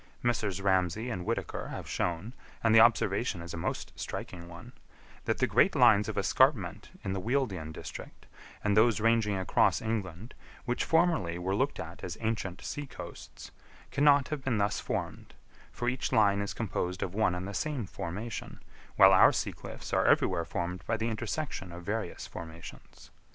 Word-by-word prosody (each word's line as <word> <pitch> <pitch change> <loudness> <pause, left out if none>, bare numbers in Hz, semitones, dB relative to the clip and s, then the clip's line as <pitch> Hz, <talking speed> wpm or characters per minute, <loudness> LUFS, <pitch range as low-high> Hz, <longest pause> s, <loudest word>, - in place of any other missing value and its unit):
Messrs. 105 -5 0
Ramsay 95 +5 +1
and 90 -5 -4
Whitaker 115 - -2
have - - -7
shown, 90 +8 -2 0.3
and 115 -1 +4
the 110 - +8
observation 110 -3 +3
is 85 - -8
a - - -4
most 80 - -4
striking 85 -1 -6
one, 85 0 -11 0.5
that - - 0
the - - +2
great - - +3
lines 100 +1 +5
of 110 - -5
escarpment 130 - +2
in 95 - -2
the 95 - -2
Wealden 110 - -1
district - - -9 0.4
and 105 -1 +2
those 110 -1 +4
ranging 110 -2 +2
across 95 - +2
England, 110 -1 -4 0.3
which 125 -1 0
formerly 160 - +2
were 90 +2 -2
looked 135 +8 0
at 80 +2 -8
as 90 - -5
ancient 110 -5 -3
sea 145 -1 -5
coasts, - - -10 0.4
cannot 140 -1 +4
have 150 -3 -4
been 125 -4 0
thus 100 0 +1
formed, - - -4 0.4
for 120 - -4
each 130 +2 -1
line 100 -4 +4
is 100 - -4
composed 95 -4 -2
of 90 - -4
one 105 -4 +2
and 90 +2 -4
the 100 - -6
same 145 -2 -2
formation, 100 +5 -6 0.4
while - - +8
our - - +8
sea - - -2
cliffs - - -9
are - - +3
everywhere 85 - +3
formed 90 0 -4
by 115 - +1
the 115 +1 -1
intersection 115 - -4
of 85 +1 -9
various 105 0 -3
formations. 80 0 -11
105 Hz, 170 wpm, -30 LUFS, 90-115 Hz, 0.5 s, the